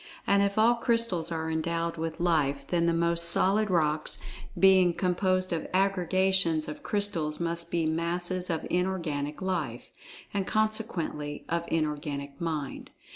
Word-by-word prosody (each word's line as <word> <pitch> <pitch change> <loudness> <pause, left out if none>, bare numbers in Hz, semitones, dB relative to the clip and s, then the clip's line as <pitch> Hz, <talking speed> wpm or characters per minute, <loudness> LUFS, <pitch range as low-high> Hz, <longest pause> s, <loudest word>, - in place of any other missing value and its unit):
And 200 0 +3
if 200 0 0
all 225 +2 +5
crystals 230 -8 0
are 160 -1 -2
endowed 165 +1 -2
with 165 0 -4
Life, 145 -5 +1
then 170 +2 0
the - - +3
most 170 0 +4
solid 210 +3 +3
rocks, 155 -4 +1 0.4
being 190 -3 +5
composed 185 0 0
of 165 - -3
aggregations 190 -3 +1
of 150 0 -7
crystals 170 -7 -1
must 170 0 -1
be 170 -2 0
masses 175 +3 -2
of 165 -2 -2
Inorganic 165 -5 -2
Life—and 180 - -5
consequently, 215 -9 -1
of 170 0 -1
Inorganic 145 -2 -3
Mind. 155 -5 -4
170 Hz, 130 wpm, -28 LUFS, 155-190 Hz, 0.4 s, all